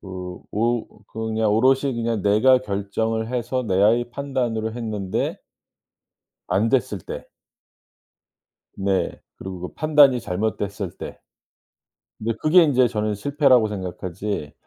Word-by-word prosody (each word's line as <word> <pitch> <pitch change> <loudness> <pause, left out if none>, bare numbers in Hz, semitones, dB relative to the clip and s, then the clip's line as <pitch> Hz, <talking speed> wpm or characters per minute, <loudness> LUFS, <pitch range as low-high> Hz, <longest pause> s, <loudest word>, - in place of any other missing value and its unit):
그 - - -14 0.4
오 115 +2 0 0.2
그건 110 0 -4
그냥 110 -1 +2
오롯이 130 +4 +3
그냥 115 -3 -1
내가 110 +6 +5
결정을 110 +2 -2
해서 125 +1 -1
나의 110 +4 +2
판단으로 120 -5 -2
했는데 110 -5 -3 1.1
안 110 +4 +2
됐을 120 -6 +1
때. - - -8 1.5
네. 95 -1 0 0.3
그리고 95 -2 -7
그 90 - -5
판단이 145 -5 +5
잘못됐을 100 -1 -3
때. - - -8 1.0
근데 115 +1 -2
그게 170 +3 +6
이제 130 -5 +3
저는 105 -2 -1
실패라고 135 -1 +3
생각하지 95 -4 -5
110 Hz, 245 characters per minute, -23 LUFS, 100-125 Hz, 1.5 s, 그게